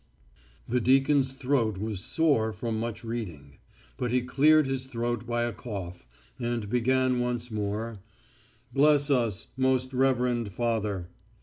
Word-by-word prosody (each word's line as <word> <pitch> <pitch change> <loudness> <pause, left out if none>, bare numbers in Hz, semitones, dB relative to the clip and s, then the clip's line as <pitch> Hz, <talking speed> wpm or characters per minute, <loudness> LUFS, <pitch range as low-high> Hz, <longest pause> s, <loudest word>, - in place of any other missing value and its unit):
The 125 +1 +1
deacon's 135 +2 +3
throat 130 -6 0
was 105 -1 -3
sore 125 - +1
from 110 +1 -3
much 115 0 -4
reading. 85 -13 -6 0.4
But 125 -2 -2
he 125 0 +2
cleared 150 +4 +4
his 135 -1 -2
throat 120 -2 -3
by 120 0 0
a 120 -1 -1
cough, 90 - -7 0.3
and 120 -3 -2
began 130 +1 +2
once 120 -1 -2
more: 105 +1 -3 0.7
"Bless 145 +1 +4
us, 115 -6 0
most 130 0 +1
reverend 125 -4 +1
Father." 105 -6 -1
120 Hz, 130 wpm, -28 LUFS, 110-130 Hz, 0.7 s, cleared